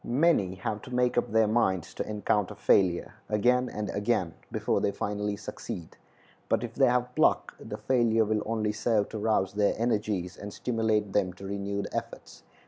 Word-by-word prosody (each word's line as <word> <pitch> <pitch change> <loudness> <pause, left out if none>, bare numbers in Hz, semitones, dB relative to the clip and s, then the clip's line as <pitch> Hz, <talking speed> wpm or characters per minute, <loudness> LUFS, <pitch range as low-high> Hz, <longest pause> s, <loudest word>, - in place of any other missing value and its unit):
Many 120 - +2
have 105 +3 -3
to 125 - -11
make 125 0 +2
up 120 - 0
their 110 0 +4
minds 95 -6 +1
to - - -4
encounter 105 -2 0
failure 90 -3 +2 0.2
again 125 +4 +2
and 105 0 -4
again 100 -5 0 0.2
before - - 0
they - - +2
finally 105 0 -2
succeed; 90 -4 -7 0.5
but - - +2
if - - -5
they - - +4
have 125 0 +1
pluck, - - +2
the - - -7
failure 115 -3 +2
will 105 0 0
only 110 -2 0
serve 105 -1 +1
to 110 - -5
rouse 105 -3 +1
their 105 0 +2
energies, 105 -6 -1
and 105 - -7
stimulate 110 -3 0
them 95 -3 +1
to 95 +2 -11
renewed 100 0 -3
efforts. - - -6
105 Hz, 175 wpm, -28 LUFS, 100-115 Hz, 0.5 s, their